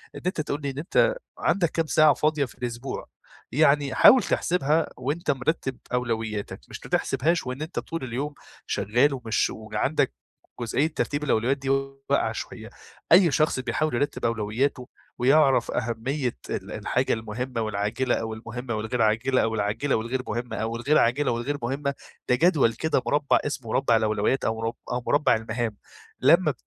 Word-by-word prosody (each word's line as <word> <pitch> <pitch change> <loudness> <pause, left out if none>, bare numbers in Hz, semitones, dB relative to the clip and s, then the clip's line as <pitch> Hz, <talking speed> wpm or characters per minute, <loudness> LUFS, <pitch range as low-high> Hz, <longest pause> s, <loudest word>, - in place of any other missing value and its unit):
إن - - -7
أنت 180 -3 0
تقول 150 0 -3
لي 140 - -2
إن 135 - -7
أنت 205 - +2 0.2
عندك 175 -4 +1
كام 165 - 0
ساعة 150 +2 +5
فاضية 150 -2 +1
في 125 - -14
الأسبوع؟ 120 +2 -4 0.5
يعني 145 -1 +3
حاول 255 -1 +8
تحسبها 160 -2 +1
وأنت 145 +5 -1
مرتب 135 -1 -2 0.2
أولوياتك، 115 -4 -2
مش - - -8
بتحسبهاش 145 +3 0
وإن 130 +3 -4
أنت 160 +3 -3
طول 165 -4 -5
اليوم 135 +4 -3 0.3
شغال 120 +7 +2
ومش 115 -4 0
وعندك 110 - -1 0.5
جزئية 130 +6 +1
ترتيب 145 -2 -2
الأولويات 130 -1 +1
دي 135 -1 -5
واقعة 135 0 0
شوية. - - -7 0.4
أي 170 -2 +7
شخص 155 -1 +2
بيحاول 155 +3 -1
يرتب 145 +1 -1
أولوياته 115 +4 -1 0.3
ويعرف 135 +2 +4
أهمية 125 +3 -2
ال - - -4
الحاجة - - 0
المهمة 115 +2 -4
والعاجلة 110 +4 0
أو 110 -1 -3
المهمة 120 +1 -5
والغير 110 +3 -2
عاجلة 115 +5 +2
أو 110 0 0
العاجلة 110 +7 0
والغير 120 +4 -2
مهمة 120 +3 -3
أو 115 +1 -2
الغير 145 +6 +2
عاجلة 125 +4 +2
والغير 120 +5 -2
مهمة، 140 +3 -2 0.3
ده 125 - +5
جدول 140 -5 +3
كده 160 +8 0
مربع 145 0 +2
اسمه 140 -5 -4
مربع 125 -4 +3
الأولويات 110 +3 +1
أو 110 - 0
مر 115 +1 -1 0.2
أو 125 0 -2
مربع 145 +1 +3
المهام، 110 -1 -3 0.4
لمّا - - +5
130 Hz, 155 wpm, -25 LUFS, 115-145 Hz, 0.5 s, حاول